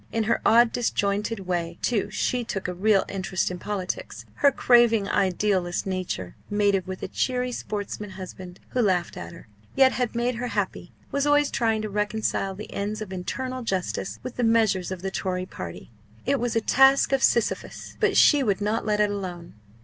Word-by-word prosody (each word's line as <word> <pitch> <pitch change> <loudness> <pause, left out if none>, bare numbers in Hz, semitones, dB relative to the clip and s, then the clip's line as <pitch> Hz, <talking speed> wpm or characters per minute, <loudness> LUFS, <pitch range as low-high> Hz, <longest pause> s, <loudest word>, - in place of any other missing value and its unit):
In 225 - 0
her 230 +2 +1
odd 235 0 +5
disjointed 205 -2 -1
way, 175 -2 -3
too, 230 -4 0
she 250 -1 -1
took 195 -4 -4
a 180 - -3
real 195 +2 +3
interest 190 -2 -2
in 180 - -6
politics. 190 -2 -4
Her 280 - +5
craving 235 -5 +4
idealist 185 -2 0
nature 185 - -4
mated 205 -3 +1
with 185 0 -6
a - - -2
cheery 250 -1 -1
sportsman 210 -2 -5
husband 185 -1 -9
who 255 - 0
laughed 185 -5 +1
at - - -7
her, 170 -8 -13 0.3
yet 265 -1 +6
had 245 -2 -2
made 240 +1 +1
her 245 +1 -3
happy - - -3 0.2
was 280 +1 0
always 290 0 +3
trying 225 -2 +1
to 215 - -3
reconcile 210 -2 -1
the 210 - -9
ends 205 +2 -3
of 210 -3 -6
eternal 255 +8 -4
justice 190 -4 -2
with 255 - -7
the 245 - 0
measures 220 -5 +2
of 185 -1 -6
the 195 - -2
Tory 185 -1 -2
party. 90 - -8 0.3
It 275 +1 +1
was 240 0 -1
a 225 - +3
task 270 +5 +5
of 270 -1 +2
Sisyphus; 235 -4 0
but - - +2
she 290 -2 +6
would 205 -7 +1
not 215 +2 -1
let 210 -1 +1
it 210 -1 +3
alone. 180 -4 -6
210 Hz, 190 wpm, -25 LUFS, 185-235 Hz, 0.3 s, yet